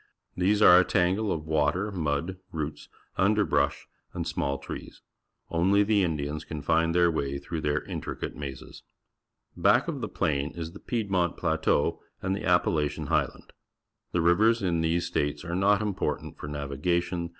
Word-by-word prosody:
These 100 +4 +2
are 90 -2 +9
a - - +5
tangle 95 +4 +1
of 80 -2 -3
water, 80 +6 +1
mud, 80 0 -2
roots, 75 -2 -5 0.3
underl^rush^ 105 +2 +2 0.3
and - - -2
small 70 0 -1
trees. - - -9 0.5
Only 95 +5 +3
the 105 -1 +3
Indians 75 -2 -2
can 75 -3 -7
find 80 +2 +2
their 85 -1 +4
way 70 -3 -2
through 80 +3 -5
their 75 0 0
intricate - - -5
mazes. 70 -2 -8 0.7
Back - - +3
of - - -3
the - - -3
plain 70 0 -1
is 80 -1 -5
the - - -11
Piedmont 95 -7 -1
Plateau 80 -2 +1 0.2
and 95 0 -1
the 100 - -5
Appalachian 80 -4 +1
Highland. - - -1 0.6
The 90 - +1
rivers 110 +7 +4
in 85 -3 +1
these 80 +2 +1
states 75 +2 -2
are 85 0 -3
not 100 +2 +3
important 105 -3 -3
for - - -6
navigation. 85 +5 -2
85 Hz, 155 wpm, -27 LUFS, 75-95 Hz, 0.7 s, are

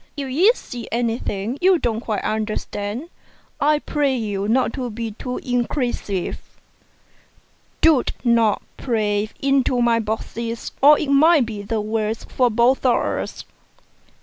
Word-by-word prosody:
If 275 -2 -4
you 360 - +5
see 240 - -8
anything 230 0 -2
you 370 0 +5
don't 230 -7 -1
quite 215 -4 -3
understand, 215 +4 -3 0.5
I 300 +1 +3
pray 290 -2 0
you 205 -4 -2
not 255 +4 +2
to 255 -3 -3
be 225 0 -5
too 250 +4 -5
inquisitive; 245 - -2 1.4
don't 310 -6 +4 0.7
pry 210 -3 0
into 270 -2 +2
my 235 -1 +3
boxes, 230 +1 -4
or 295 +2 +8
it 280 - -2
may 310 +3 +6
be 220 -4 -3
the 215 +2 -2
worse 215 +1 -2
for 250 -2 +1
both 240 +4 +2
of 250 -2 +4
us." - - -3
235 Hz, 130 wpm, -21 LUFS, 215-270 Hz, 1.4 s, or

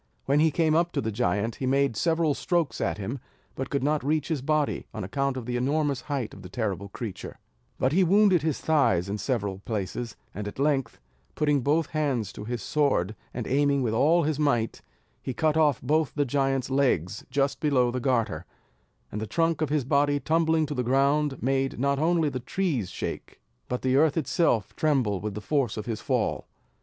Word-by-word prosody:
When 140 +2 +3
he 160 +1 +5
came 155 +1 +1
up 170 +2 +2
to - - 0
the 110 - -2
giant, 105 0 -1
he 130 - -2
made 135 -2 +2
several 160 +3 +2
strokes 170 0 -1
at - - 0
him, 115 +7 -4 0.3
but 135 0 -5
could 140 -2 -1
not 150 0 +1
reach 150 +2 0
his 155 -5 -1
body, 150 +1 0
on 110 - -4
account 135 +7 -1
of 125 - -5
the 120 0 -2
enormous 140 +1 0
height 135 -7 -3
of - - -11
the - - -10
terrible 100 -5 -3
creature, 105 -1 -7 0.4
but 130 - +1
he 185 +5 +4
wounded 190 -1 +4
his 155 -1 -1
thighs 120 - +2
in 105 +2 -3
several 100 -7 -2
places; 110 +2 -4 0.2
and 105 0 -5
at 105 - -7
length, 135 -4 0 0.4
putting 145 -2 +2
both 150 +5 +1
hands 135 - -1
to 105 - -8
his 120 +1 -4
sword, 140 - +1 0.2
and 120 -2 -5
aiming 140 0 +2
with 110 -3 0
all 155 +9 +4
his 150 -1 -1
might, 120 -7 0 0.4
he 130 - -5
cut 155 +4 +1
off 150 -3 +3
both 155 -1 +1
the 145 -1 +1
giant's 135 -1 0
legs 110 - +1
just 135 +1 0
below 130 -5 +2
the 125 - -2
garter; 120 -3 0 0.6
and 105 - -4
the 110 - -3
trunk 165 - 0
of 155 - +1
his 145 -3 0
body 145 +1 +2
tumbling 160 0 +2
to 150 - -4
the 125 - -1
ground, 140 +3 +2
made 135 +1 0
not 140 +1 +1
only 165 0 +2
the 130 -3 -2
trees 130 - -1
shake, - - -6 0.3
but 125 - -3
the 130 0 +2
earth 155 +2 +3
itself 135 - +1
tremble 130 -11 +1
with 105 -2 -4
the 105 - -5
force 130 -1 0
of 105 - -4
his 115 -3 -4
fall. - - -1
135 Hz, 200 wpm, -27 LUFS, 120-150 Hz, 0.6 s, he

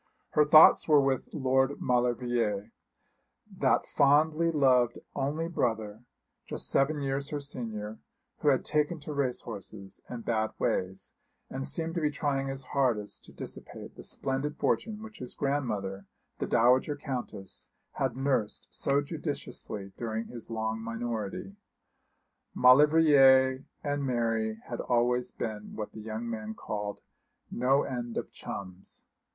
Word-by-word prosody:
Her 150 - +4
thoughts 155 +1 +8
were 150 -2 +6
with 135 -2 0
Lord 135 0 +1
Maulevrier, 120 -4 0 0.8
that - - +2
fondly 155 +4 +3
loved 130 -6 +3 0.2
only 150 +4 -1
brother, 110 -8 -2 0.4
just - - -1
seven 145 +2 +2
years 140 +1 -1
her 145 - -2
senior, 110 -6 -4 0.4
who - - -2
had 135 -3 +3
taken 150 +2 +1
to 150 +1 -5
race 135 -3 0
horses 100 -3 -8
and 120 -2 -7
bad 110 -2 0
ways, 95 +1 -2 0.4
and 135 +1 -3
seemed 165 0 -1
to 170 - -1
be 150 - +2
trying 140 -2 -1
his 135 0 -3
hardest 120 -7 -1
to - - -14
dissipate - - -7
the - - -10
splendid 140 +3 -2
fortune 220 -1 -1
which 220 0 -11
his 125 - -7
grandmother, 105 -9 -2 0.3
the - - -2
dowager 125 +5 +3
Countess, 125 -9 -6 0.2
had 130 -2 -2
nursed 135 -6 0
so 140 +1 +1
judiciously 145 - -5
during 115 -1 -3
his 120 -2 -7
long 110 0 -2
minority. 115 - -4 1.0
Maulevrier 135 -1 +6 0.2
and 145 -1 -1
Mary 115 -4 0
had 120 - -5
always 125 +1 +1
been 105 -1 -5
what 105 -1 -5
the 110 - -9
young 110 +2 -5
man 110 -1 -5
called 105 -1 -5 0.5
'no 135 +3 +2
end 120 -3 -4
of - - -4
chums.' 95 -1 -7
125 Hz, 135 wpm, -29 LUFS, 110-145 Hz, 1.0 s, thoughts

